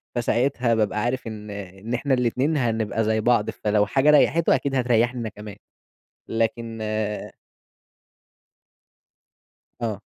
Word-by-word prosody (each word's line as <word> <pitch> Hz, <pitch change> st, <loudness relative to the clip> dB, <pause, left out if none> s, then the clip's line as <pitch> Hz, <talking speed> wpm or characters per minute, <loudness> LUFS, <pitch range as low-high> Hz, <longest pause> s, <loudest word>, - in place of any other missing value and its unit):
فساعتها 120 Hz, 0 st, +1 dB
بابقى 105 Hz, -1 st, 0 dB
عارِف 125 Hz, 0 st, -2 dB
إن 105 Hz, -1 st, -7 dB
إن 100 Hz, +3 st, -7 dB
إحنا 135 Hz, +3 st, 0 dB
الاتنين 130 Hz, +5 st, +1 dB
هنبقى 115 Hz, -3 st, 0 dB
زي 110 Hz, 0 st, +1 dB
بعض، 120 Hz, -2 st, +2 dB
فلو 105 Hz, 0 st, +1 dB
حاجة 135 Hz, +8 st, +2 dB
ريَّحته 155 Hz, +1 st, +4 dB
أكيد 135 Hz, +1 st, -2 dB
هتريحني 120 Hz, -1 st, +2 dB
أنا 110 Hz, -, -3 dB
كمان، 105 Hz, -1 st, -10 dB, 0.7 s
لكن 115 Hz, 0 st, -2 dB
آآ 110 Hz, -1 st, -3 dB, 2.5 s
آه. 110 Hz, -4 st, -2 dB
115 Hz, 120 wpm, -24 LUFS, 105-125 Hz, 2.5 s, ريَّحته